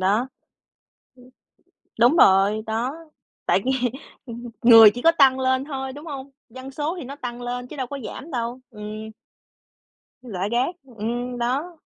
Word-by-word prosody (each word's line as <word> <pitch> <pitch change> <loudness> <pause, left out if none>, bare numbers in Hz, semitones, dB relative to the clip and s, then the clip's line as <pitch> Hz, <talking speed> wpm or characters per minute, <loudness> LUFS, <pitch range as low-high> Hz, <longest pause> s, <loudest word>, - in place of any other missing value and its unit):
đó. 195 +3 +3
Ừm. 250 - -2 1.7
Đúng 245 +7 +5
rồi, 195 +1 +5
đó, 230 +5 -2 0.5
tại - - +2
vì, 265 - +2 0.5
ừm, 240 -1 -8
người 225 -3 +9
chỉ 245 - -6
có 330 - +6
tăng 265 -2 +5
lên 260 +1 +1
thôi, 265 -2 -5
đúng 295 +4 -10
hông? 280 -3 -7 0.2
Dân 260 +3 -10
số 300 +5 -3
thì 270 - -7
nó 275 - -8
tăng 245 -3 -7
lên 245 0 -4
chứ 305 - -10
đâu 260 -3 -3
có 280 - -6
giảm 310 +8 -8
đâu, 240 0 -3
ừm. 215 0 -7 1.1
Rải 200 -6 -4
rác, 250 +9 0 0.2
ừm, 240 +3 -3
đó. 275 +8 -2
245 Hz, 160 wpm, -23 LUFS, 230-270 Hz, 1.7 s, người